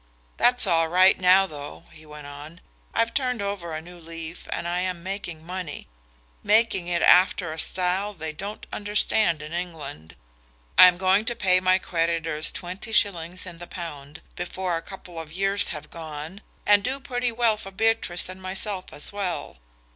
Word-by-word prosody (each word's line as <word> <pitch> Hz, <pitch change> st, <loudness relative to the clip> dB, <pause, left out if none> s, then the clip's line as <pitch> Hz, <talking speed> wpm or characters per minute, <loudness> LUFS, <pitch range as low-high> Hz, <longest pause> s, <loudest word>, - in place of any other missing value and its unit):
That's 245 Hz, -1 st, +5 dB
all 165 Hz, -3 st, +3 dB
right 185 Hz, +3 st, +5 dB
now, 185 Hz, +1 st, +6 dB
though," 145 Hz, -5 st, -9 dB
he 155 Hz, 0 st, -15 dB
went 150 Hz, -1 st, -10 dB
on. 145 Hz, +4 st, -10 dB, 0.3 s
"I've 230 Hz, 0 st, 0 dB
turned 250 Hz, -3 st, 0 dB
over 200 Hz, -4 st, -3 dB
a 155 Hz, 0 st, -5 dB
new 175 Hz, +1 st, -12 dB
leaf 165 Hz, 0 st, -8 dB
and 170 Hz, -, -3 dB
I 175 Hz, +1 st, -1 dB
am 180 Hz, -2 st, -3 dB
making 175 Hz, -4 st, -5 dB
money 180 Hz, -4 st, -6 dB, 0.5 s
making 215 Hz, -4 st, +3 dB
it 175 Hz, -1 st, 0 dB
after 180 Hz, -2 st, +5 dB
a 160 Hz, -, -7 dB
style 185 Hz, +4 st, +2 dB
they 160 Hz, -2 st, -5 dB
don't 200 Hz, +7 st, -7 dB
understand 205 Hz, -5 st, +1 dB
in 155 Hz, +2 st, -8 dB
England. 160 Hz, -, -6 dB, 0.6 s
I 185 Hz, -, +10 dB
am 180 Hz, -1 st, +3 dB
going 190 Hz, +3 st, +3 dB
to 240 Hz, 0 st, -1 dB
pay 185 Hz, -3 st, +4 dB
my 185 Hz, 0 st, +3 dB
creditors 165 Hz, -3 st, 0 dB
twenty 185 Hz, +6 st, -6 dB
shillings 180 Hz, -4 st, +2 dB
in 175 Hz, -2 st, -9 dB
the 175 Hz, -, -8 dB
pound 150 Hz, -4 st, -8 dB
before 180 Hz, 0 st, -3 dB
a 165 Hz, -, -3 dB
couple 180 Hz, -2 st, -10 dB
of 160 Hz, -1 st, -8 dB
years 195 Hz, +2 st, +3 dB
have 150 Hz, -2 st, -6 dB
gone, 160 Hz, +3 st, -8 dB, 0.2 s
and 205 Hz, -1 st, +5 dB
do 265 Hz, +4 st, -2 dB
pretty 245 Hz, -2 st, -2 dB
well 230 Hz, -1 st, +2 dB
for 210 Hz, -2 st, -8 dB
Beatrice 195 Hz, -3 st, 0 dB
and 185 Hz, +1 st, -10 dB
myself 190 Hz, +1 st, -4 dB
as 145 Hz, -, -1 dB
well. 190 Hz, -, -3 dB
180 Hz, 175 wpm, -25 LUFS, 165-200 Hz, 0.6 s, I